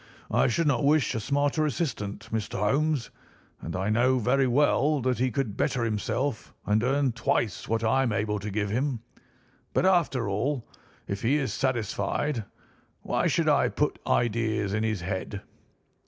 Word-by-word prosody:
I - - +3
should 165 +8 +1
not 140 -4 +2
wish 145 -1 +3
a 115 - -1
smarter 145 +6 +1
assistant, 110 -8 -3
Mr. 110 -2 -2
Holmes; 135 +6 +1 0.5
and 85 - -5
I 95 +3 -1
know 125 +4 +3
very 130 +3 +2
well 145 +3 +3
that 125 0 0
he 130 +1 +2
could 125 -6 -2
better 120 - 0
himself 115 +3 -2
and 105 +1 +2
earn 135 +1 +2
twice 115 -1 -1
what 115 0 0
I 115 +4 +3
am 125 -4 +1
able 105 -1 -1
to 105 +2 -5
give 105 0 -2
him. 125 0 -1 0.7
But, - - +3
after 165 - +2
all, 120 +6 -1 0.4
if 100 0 -3
he 125 +5 +2
is 140 -3 -1
satisfied, 115 0 -1 0.6
why - - 0
should - - +1
I - - +4
put - - -1
ideas 110 -3 +1
in 105 - 0
his 110 -4 -1
head?" 95 +2 -4
120 Hz, 165 wpm, -27 LUFS, 105-140 Hz, 0.7 s, I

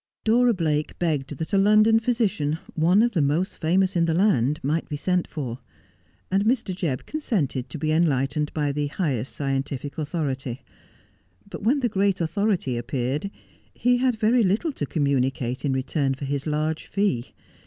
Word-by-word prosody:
Dora 240 +1 +4
Blake 155 -4 -1
begged 150 -5 -1
that 160 +7 -5
a 195 - +5
London 215 +3 +5
physician, 215 -11 0 0.2
one 175 +7 +4
of 240 - +2
the 175 - +1
most 150 +7 0
famous 185 +4 +2
in 170 -1 +3
the 165 -1 0
land, 150 - +2
might 155 +4 -1
be 150 - -3
sent 180 +3 0
for; 130 -5 -5 0.7
and 195 +1 +2
Mr. 225 -4 +1
Jebb 165 -9 -2
consented 175 - -2
to - - -6
be 155 +1 -1
enlightened 150 -2 +1
by 145 -2 -1
the 145 +1 -1
highest 140 - -2
scientific 140 +1 -3
authority; 135 -5 -3 0.8
but - - -8
when 270 +6 +2
the 245 - +2
great 200 -2 +1
authority 175 - 0
appeared 130 +8 -2 0.5
he 245 0 +2
had 250 -1 +2
very 230 +3 +3
little 215 - +1
to 145 - -4
communicate 135 -3 0
in 140 - +1
return 135 +1 0
for 140 - -6
his 140 +2 -2
large 155 +1 -1
fee. 195 - -1
155 Hz, 165 wpm, -24 LUFS, 140-200 Hz, 0.8 s, a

